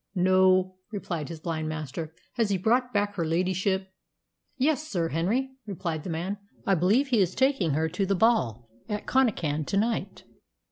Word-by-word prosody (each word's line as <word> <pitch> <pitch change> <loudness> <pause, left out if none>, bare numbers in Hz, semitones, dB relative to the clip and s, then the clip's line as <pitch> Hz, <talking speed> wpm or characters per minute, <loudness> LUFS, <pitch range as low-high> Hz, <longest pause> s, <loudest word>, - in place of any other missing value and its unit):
"No," 185 0 +4
replied 170 -7 -4
his 165 -2 -7
blind 160 -1 -3
master. 155 0 -5 0.2
"Has 230 -3 +1
he 195 - +2
brought 245 +6 +2
back 205 -1 0
her 180 -5 -1
ladyship?" 190 +3 0 0.7
"Yes, 300 +3 +1
Sir 170 - -1
Henry," 215 - 0 0.2
replied 170 -6 -3
the - - -5
man. 180 +5 -3 0.3
"I 195 - +3
believe 205 - +3
he 240 -4 +3
is 185 -1 +1
taking 260 - +2
her 160 +2 +1
to 195 +4 -1
the 195 - +2
ball 150 - +2 0.2
over 210 - 0
at - - -14
Connachan 175 - +1
to 195 - 0
night." 225 +2 -1
185 Hz, 175 wpm, -27 LUFS, 165-220 Hz, 0.7 s, No